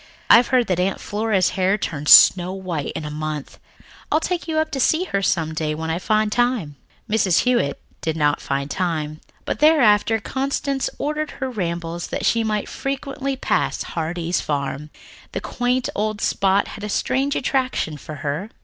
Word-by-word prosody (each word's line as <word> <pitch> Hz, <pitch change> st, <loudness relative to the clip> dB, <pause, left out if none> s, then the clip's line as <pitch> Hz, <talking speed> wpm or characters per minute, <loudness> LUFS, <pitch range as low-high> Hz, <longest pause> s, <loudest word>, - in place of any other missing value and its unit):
I've 235 Hz, +1 st, +7 dB
heard 255 Hz, -2 st, +3 dB
that 180 Hz, -4 st, -1 dB
Aunt 190 Hz, +2 st, 0 dB
Flora's 205 Hz, -3 st, 0 dB
hair 190 Hz, +2 st, +1 dB
turned 150 Hz, -7 st, -3 dB
snow 180 Hz, 0 st, +8 dB
white 180 Hz, -6 st, -4 dB
in 155 Hz, -, -4 dB
a 150 Hz, -, -5 dB
month. 150 Hz, -1 st, -5 dB, 0.5 s
I'll 310 Hz, -, +4 dB
take 350 Hz, +1 st, -3 dB
you 315 Hz, -1 st, -1 dB
up 315 Hz, 0 st, 0 dB
to 270 Hz, -, -3 dB
see 315 Hz, +7 st, +3 dB
her 200 Hz, -, -2 dB
some 160 Hz, -4 st, 0 dB
day 155 Hz, -1 st, -2 dB
when 160 Hz, +1 st, -3 dB
I 165 Hz, -, -1 dB
find 215 Hz, +1 st, +1 dB
time." 240 Hz, -, 0 dB, 0.3 s
Mrs. 200 Hz, -5 st, +3 dB
Hewitt 245 Hz, -, +1 dB, 0.2 s
did 160 Hz, 0 st, -2 dB
not 150 Hz, -1 st, +1 dB
find 140 Hz, +1 st, -3 dB
time, 155 Hz, -4 st, -2 dB, 0.2 s
but -, -, -3 dB
thereafter 230 Hz, -8 st, +4 dB
Constance 275 Hz, +3 st, -2 dB
ordered 300 Hz, +1 st, -2 dB
her 265 Hz, -1 st, -3 dB
rambles 170 Hz, -5 st, -3 dB
that -, -, -3 dB
she 230 Hz, -1 st, +2 dB
might 215 Hz, -2 st, -1 dB
frequently 275 Hz, 0 st, -3 dB
pass 260 Hz, -, -1 dB
Heartsease 170 Hz, +1 st, -2 dB
Farm. 145 Hz, 0 st, -3 dB, 0.4 s
The -, -, -2 dB
quaint 245 Hz, +1 st, -1 dB
old 215 Hz, 0 st, -2 dB
spot 195 Hz, 0 st, +1 dB
had 210 Hz, -, -9 dB
a 210 Hz, -, -4 dB
strange 275 Hz, +7 st, 0 dB
attraction 255 Hz, -, -1 dB
for 150 Hz, +1 st, -9 dB
her. 150 Hz, +9 st, -2 dB
200 Hz, 175 wpm, -21 LUFS, 160-255 Hz, 0.5 s, snow